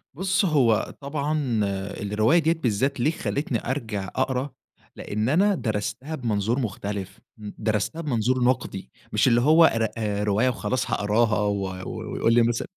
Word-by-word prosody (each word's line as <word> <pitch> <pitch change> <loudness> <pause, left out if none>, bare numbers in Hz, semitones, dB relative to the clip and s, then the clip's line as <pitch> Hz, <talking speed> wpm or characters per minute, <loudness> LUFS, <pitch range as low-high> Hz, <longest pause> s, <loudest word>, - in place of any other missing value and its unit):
بُص، 190 +4 +1
هو 125 - +2
طبعًا 140 -4 -1 0.4
الرواية 110 +11 +3
ديّة 165 +1 +2
بالذات 135 -2 -1
ليه 145 +6 +2
خلّتني 140 -7 -3
أرجع 110 -8 -3
أقرا، 130 +1 0 0.5
لإن 105 +3 -2
أنا 195 +7 +3
درستها 120 +6 -3
بمنظور 115 -2 -1
مختلف، 100 -4 -4 0.2
ن 105 -1 -8
درستها 110 +9 -1
بمنظور 130 -3 0
نقدي، 120 - -1 0.2
مش - - +3
اللي 120 -1 +4
هو 160 +5 +6
ر 115 - +1
آآ، 105 -2 -1
رواية 105 +5 +2
وخلاص 125 +1 -2
هأقراها 105 +2 +2
و 100 -1 0 0.2
و - - -6
ويقول 115 - +2
لي 120 - +5
مث 120 0 0
120 Hz, 150 wpm, -25 LUFS, 105-140 Hz, 0.5 s, هو